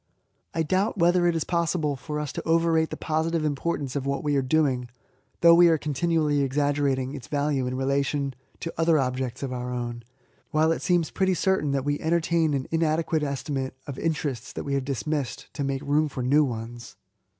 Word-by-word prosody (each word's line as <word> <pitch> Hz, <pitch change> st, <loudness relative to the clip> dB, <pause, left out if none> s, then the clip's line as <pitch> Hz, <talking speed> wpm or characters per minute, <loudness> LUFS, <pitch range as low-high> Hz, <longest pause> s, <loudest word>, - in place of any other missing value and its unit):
I 165 Hz, -, +1 dB
doubt 190 Hz, +7 st, 0 dB
whether 175 Hz, 0 st, +4 dB
it 170 Hz, -, +2 dB
is 160 Hz, -, 0 dB
possible 170 Hz, -4 st, 0 dB
for 150 Hz, +4 st, -5 dB
us 150 Hz, -2 st, -4 dB
to -, -, -4 dB
overrate 165 Hz, -1 st, +3 dB
the -, -, -6 dB
positive 160 Hz, 0 st, 0 dB
importance 145 Hz, -2 st, -2 dB
of 140 Hz, -1 st, -2 dB
what 140 Hz, 0 st, -1 dB
we 145 Hz, -1 st, +1 dB
are 135 Hz, -, +3 dB
doing, 130 Hz, -3 st, +1 dB, 0.5 s
though 170 Hz, 0 st, +8 dB
we 175 Hz, +1 st, +7 dB
are 165 Hz, -1 st, +4 dB
continually 150 Hz, 0 st, +1 dB
exaggerating 140 Hz, -1 st, 0 dB
its 140 Hz, -4 st, -8 dB
value 145 Hz, -3 st, 0 dB
in 125 Hz, -, -3 dB
rela* 135 Hz, +2 st, +1 dB
tion 140 Hz, -1 st, -2 dB, 0.3 s
to 165 Hz, -, -4 dB
other 165 Hz, -1 st, +4 dB
objects 130 Hz, -1 st, -2 dB
of 130 Hz, -2 st, -3 dB
our 125 Hz, 0 st, -4 dB
own, 120 Hz, -1 st, -4 dB, 0.5 s
while 155 Hz, +1 st, +3 dB
it 165 Hz, -, -1 dB
seems 175 Hz, -3 st, +1 dB
pretty 190 Hz, -1 st, +1 dB
certain 190 Hz, -4 st, +1 dB
that 135 Hz, -1 st, -1 dB
we 145 Hz, 0 st, 0 dB
entertain 165 Hz, -1 st, +1 dB
an 130 Hz, -1 st, -3 dB
inade(}»etcr 160 Hz, 0 st, +1 dB
estimate 140 Hz, -2 st, -3 dB
of 140 Hz, -3 st, -6 dB
interests 145 Hz, -6 st, -2 dB
that -, -, -5 dB
we 140 Hz, -, -3 dB
hajffT 135 Hz, -4 st, -2 dB
£smissed, 145 Hz, -8 st, -3 dB
to 140 Hz, -, -3 dB
make 135 Hz, 0 st, -2 dB
room 150 Hz, +2 st, +2 dB
for 130 Hz, -2 st, -4 dB
new 145 Hz, +3 st, +4 dB
oa«r. 115 Hz, -1 st, -4 dB
145 Hz, 195 wpm, -26 LUFS, 135-165 Hz, 0.5 s, though